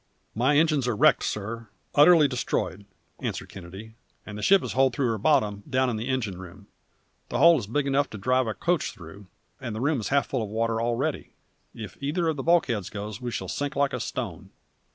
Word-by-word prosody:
"My 130 Hz, +6 st, +2 dB
engines 150 Hz, -5 st, +2 dB
are 120 Hz, -, 0 dB
wrecked, -, -, +4 dB
sir; 110 Hz, +2 st, -4 dB, 0.3 s
utterly 150 Hz, +1 st, +7 dB
destroyed," 105 Hz, -, -3 dB, 0.3 s
answered -, -, -4 dB
Kennedy; 95 Hz, +4 st, -10 dB, 0.3 s
"and 105 Hz, -, -8 dB
the 105 Hz, -, -6 dB
ship 195 Hz, -, +4 dB
is -, -, -4 dB
holed 130 Hz, -2 st, +2 dB
through 130 Hz, -2 st, +1 dB
her 110 Hz, -, -3 dB
bottom, 105 Hz, -6 st, +2 dB
down 130 Hz, -1 st, +1 dB
in -, -, -3 dB
the 110 Hz, +3 st, -4 dB
engine 115 Hz, -9 st, -2 dB
room. 95 Hz, +2 st, -12 dB, 0.6 s
The -, -, -2 dB
hole 170 Hz, -1 st, +6 dB
is 105 Hz, -, -7 dB
big 140 Hz, +6 st, -1 dB
enough 140 Hz, +1 st, +1 dB
to 110 Hz, -, -8 dB
drive 130 Hz, +4 st, +1 dB
a 110 Hz, -, -3 dB
coach 175 Hz, -3 st, -1 dB
through, 95 Hz, +4 st, -13 dB, 0.3 s
and 120 Hz, -5 st, -5 dB
the -, -, -4 dB
room 140 Hz, +2 st, +1 dB
is 105 Hz, -, -4 dB
half 140 Hz, 0 st, +2 dB
full 130 Hz, -, -2 dB
of 110 Hz, -, -4 dB
water 115 Hz, +1 st, -1 dB
already. 120 Hz, 0 st, -2 dB, 0.4 s
If 105 Hz, -4 st, -8 dB
either 160 Hz, +5 st, -1 dB
of 160 Hz, -, 0 dB
the 135 Hz, -, -4 dB
bulkheads 130 Hz, -, +1 dB
goes 105 Hz, +3 st, -7 dB
we 125 Hz, -, -3 dB
shall 115 Hz, -, -4 dB
sink 145 Hz, +1 st, -3 dB
like 140 Hz, 0 st, +1 dB
a -, -, -2 dB
stone!" -, -, -5 dB
120 Hz, 215 wpm, -26 LUFS, 105-140 Hz, 0.6 s, utterly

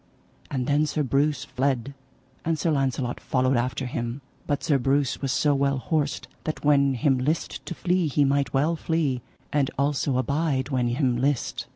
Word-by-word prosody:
And 130 Hz, -3 st, -2 dB
then 145 Hz, +3 st, +2 dB
Sir 150 Hz, +1 st, 0 dB
Breuse 140 Hz, +1 st, +1 dB
fled, 135 Hz, 0 st, -1 dB, 0.5 s
and 165 Hz, 0 st, 0 dB
Sir 165 Hz, -, 0 dB
Launcelot 135 Hz, -3 st, 0 dB
followed 130 Hz, 0 st, +1 dB
after 125 Hz, +2 st, -1 dB
him. 120 Hz, +2 st, -4 dB, 0.3 s
But 145 Hz, -, -1 dB
Sir 140 Hz, -3 st, +2 dB
Breuse 135 Hz, +1 st, +1 dB
was 135 Hz, -2 st, -1 dB
so 145 Hz, +2 st, +2 dB
well 140 Hz, 0 st, +1 dB
horsed 145 Hz, +3 st, -1 dB, 0.2 s
that 155 Hz, -1 st, -4 dB
when 140 Hz, -2 st, +4 dB
him 130 Hz, +2 st, +2 dB
list 150 Hz, +6 st, -1 dB
to 175 Hz, -, -4 dB
flee 180 Hz, 0 st, +1 dB
he 145 Hz, 0 st, +2 dB
might 140 Hz, -3 st, +1 dB
well 150 Hz, +5 st, +2 dB
flee, 155 Hz, -6 st, 0 dB, 0.3 s
and 145 Hz, -2 st, +2 dB
also 140 Hz, -1 st, +1 dB
abide 140 Hz, 0 st, 0 dB
when 125 Hz, -3 st, +1 dB
him 125 Hz, 0 st, +1 dB
list. 135 Hz, 0 st, -1 dB
140 Hz, 175 wpm, -25 LUFS, 130-150 Hz, 0.5 s, when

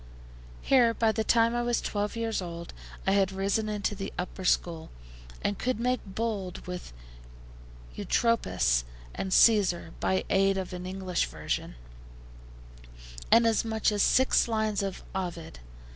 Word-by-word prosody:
Here, 240 Hz, -4 st, +4 dB
by 225 Hz, -1 st, +2 dB
the 220 Hz, +1 st, -1 dB
time 230 Hz, +1 st, +3 dB
I 240 Hz, -, 0 dB
was 240 Hz, 0 st, +1 dB
twelve 205 Hz, +1 st, -2 dB
years 225 Hz, -3 st, -1 dB
old, 170 Hz, -1 st, -7 dB, 0.3 s
I 195 Hz, -, +2 dB
had 195 Hz, -1 st, +3 dB
risen 200 Hz, +3 st, -1 dB
into 210 Hz, -1 st, -1 dB
the 195 Hz, 0 st, -5 dB
upper 185 Hz, +1 st, -5 dB
school, 170 Hz, -2 st, 0 dB, 0.5 s
and 205 Hz, -, -1 dB
could 255 Hz, -2 st, -1 dB
make 250 Hz, +1 st, +1 dB
bold 200 Hz, -2 st, -4 dB
with 180 Hz, -, -7 dB, 1.0 s
Eutropius 60 Hz, -, +1 dB, 0.3 s
and 190 Hz, -, -4 dB
Caesar 185 Hz, -7 st, +4 dB
by 190 Hz, -, +1 dB
aid 195 Hz, 0 st, +3 dB
of 185 Hz, -1 st, -4 dB
an 180 Hz, 0 st, -6 dB
English 185 Hz, -1 st, -1 dB
version 75 Hz, -5 st, -4 dB, 1.5 s
and 230 Hz, 0 st, +6 dB
as 225 Hz, -1 st, +2 dB
much 220 Hz, -1 st, 0 dB
as 205 Hz, -1 st, 0 dB
six 260 Hz, +3 st, +4 dB
lines 220 Hz, -2 st, 0 dB
of 195 Hz, -1 st, -4 dB
Ovid. 175 Hz, -, -5 dB
200 Hz, 145 wpm, -28 LUFS, 185-225 Hz, 1.5 s, and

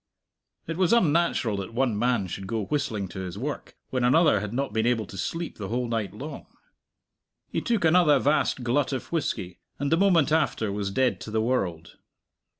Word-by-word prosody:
It 165 Hz, 0 st, -4 dB
was 185 Hz, +3 st, +3 dB
unnatural 165 Hz, -, +2 dB
that 100 Hz, +4 st, -6 dB
one 125 Hz, -3 st, +1 dB
man 120 Hz, -1 st, +1 dB
should 95 Hz, +2 st, -6 dB
go 110 Hz, -2 st, -2 dB
whistling 110 Hz, -9 st, -2 dB
to 95 Hz, -, -7 dB
his 90 Hz, -2 st, -5 dB
work, -, -, -5 dB, 0.2 s
when 130 Hz, -1 st, 0 dB
another 145 Hz, -1 st, +4 dB
had 105 Hz, 0 st, -5 dB
not 130 Hz, -1 st, -2 dB
been 110 Hz, +1 st, +1 dB
able 115 Hz, -3 st, +1 dB
to 95 Hz, -, -11 dB
sleep 165 Hz, -, -4 dB
the 100 Hz, -, -4 dB
whole 120 Hz, +3 st, -1 dB
night 115 Hz, -3 st, -2 dB
long. 140 Hz, +8 st, -8 dB, 1.0 s
He -, -, -1 dB
took 230 Hz, -7 st, 0 dB
another 160 Hz, -3 st, +5 dB
vast 135 Hz, -1 st, +1 dB
glut 130 Hz, +4 st, +1 dB
of 130 Hz, -, -5 dB
whisky, 95 Hz, -, -2 dB, 0.2 s
and 140 Hz, 0 st, -2 dB
the 165 Hz, -, +4 dB
moment 175 Hz, -6 st, +4 dB
after 115 Hz, -9 st, +1 dB
was 100 Hz, 0 st, -2 dB
dead 130 Hz, +6 st, +1 dB
to -, -, -7 dB
the 110 Hz, +1 st, 0 dB
world. 95 Hz, -9 st, -2 dB
125 Hz, 190 wpm, -26 LUFS, 105-150 Hz, 1.0 s, another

